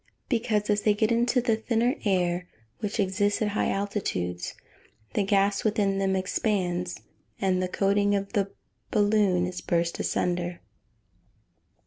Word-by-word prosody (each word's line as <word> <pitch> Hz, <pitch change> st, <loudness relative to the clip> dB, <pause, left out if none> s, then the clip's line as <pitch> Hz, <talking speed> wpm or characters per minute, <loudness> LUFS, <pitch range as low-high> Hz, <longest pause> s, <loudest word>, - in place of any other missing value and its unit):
_ -, -, -43 dB
Because, 220 Hz, -4 st, +1 dB
as 205 Hz, 0 st, +2 dB
they 210 Hz, -1 st, +3 dB
get 220 Hz, +2 st, +1 dB
into 240 Hz, +2 st, +2 dB
the 235 Hz, -2 st, +2 dB
thinner 230 Hz, +2 st, +1 dB
air, 180 Hz, -2 st, +1 dB, 0.3 s
which 210 Hz, +1 st, -3 dB
exists 205 Hz, +1 st, +1 dB
at 215 Hz, -, +1 dB
high 205 Hz, -, 0 dB
altitudes, 135 Hz, -, -2 dB, 0.6 s
the -, -, +1 dB
gas 200 Hz, 0 st, +2 dB
within 205 Hz, -3 st, +1 dB
them 190 Hz, -1 st, +1 dB
expands, 180 Hz, -2 st, -1 dB, 0.4 s
and 185 Hz, -1 st, +1 dB
the 185 Hz, -, 0 dB
coating 200 Hz, +2 st, +2 dB
of 200 Hz, +2 st, -3 dB
the 200 Hz, -3 st, +1 dB, 0.4 s
balloon 205 Hz, -4 st, +3 dB
is 180 Hz, 0 st, -5 dB
burst 170 Hz, 0 st, 0 dB
asunder. 175 Hz, 0 st, -1 dB
200 Hz, 140 wpm, -27 LUFS, 180-210 Hz, 0.6 s, they